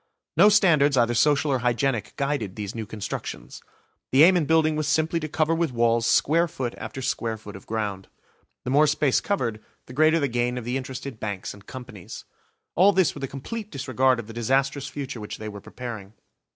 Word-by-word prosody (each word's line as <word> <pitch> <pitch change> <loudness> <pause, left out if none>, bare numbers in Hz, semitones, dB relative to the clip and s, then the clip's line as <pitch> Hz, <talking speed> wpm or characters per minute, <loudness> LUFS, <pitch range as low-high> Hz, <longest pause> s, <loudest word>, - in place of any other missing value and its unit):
No 195 +6 +7
standards 155 -9 +4
either 120 -1 +3
social 145 +4 +3
or 130 - +1
hygienic 120 -1 0
guided 140 -9 -2
these 105 -3 -5
new 110 -2 -5
constructions. 100 - -6 0.5
The 135 +3 +7
aim 185 +3 +7
in 165 -5 +1
building 155 -1 +3
was 155 -1 -1
simply 160 +2 +1
to 155 - -4
cover 155 +2 +1
with 165 -3 0
walls 115 -1 +2
square 165 +7 +3
foot 130 -6 -4
after 130 - -6
square 115 -3 -2
foot 105 -2 -11
of 95 - -12
ground. 105 -4 -3 0.6
The 125 - -3
more 150 +3 +5
space 145 -2 +2
covered, 115 - -2 0.2
the 125 - -11
greater 155 +4 +4
the 140 - +1
gain 120 0 -1
of 125 - -5
the 125 +2 -2
interested 130 -2 -5
Banks 100 -3 -4
and 100 0 -16
Companies. 115 -6 -9 0.5
All 195 +4 +5
this 185 -6 +3
with 140 - -8
a - - -1
complete 210 - -6
disregard 130 - +1
of 115 - -6
the 115 - -10
disastrous 135 +4 0
future 140 -4 -6
which 105 - -6
they 110 - -7
were 100 -1 -8
preparing. 110 -5 -8
130 Hz, 200 wpm, -25 LUFS, 115-150 Hz, 0.6 s, No